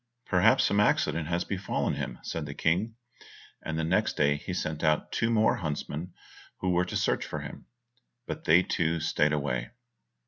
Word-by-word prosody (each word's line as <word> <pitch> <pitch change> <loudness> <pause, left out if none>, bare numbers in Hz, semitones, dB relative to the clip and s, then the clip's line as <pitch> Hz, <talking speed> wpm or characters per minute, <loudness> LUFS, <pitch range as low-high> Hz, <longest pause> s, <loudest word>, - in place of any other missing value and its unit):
"Perhaps 95 +4 +4
some 100 - +2
accident 85 -5 +2
has 85 +1 0
befallen 95 -1 -2
him," - - -4
said 80 -3 -4
the 70 - -7
King, 95 +8 0 0.7
and 80 -1 -4
the 80 - 0
next 85 +4 +1
day 70 0 +3
he 75 - -6
sent 80 -4 -3
out 75 -1 +1
two 115 - 0
more 110 +1 +3
huntsmen 80 -1 -4 0.4
who 95 - -1
were 90 0 +2
to - - -2
search - - +1
for - - -5
him, - - -9 0.6
but - - -6
they 85 +3 +6
too 85 -1 0
stayed 75 -1 +1
away. 65 -5 -1
85 Hz, 175 wpm, -28 LUFS, 75-95 Hz, 0.7 s, they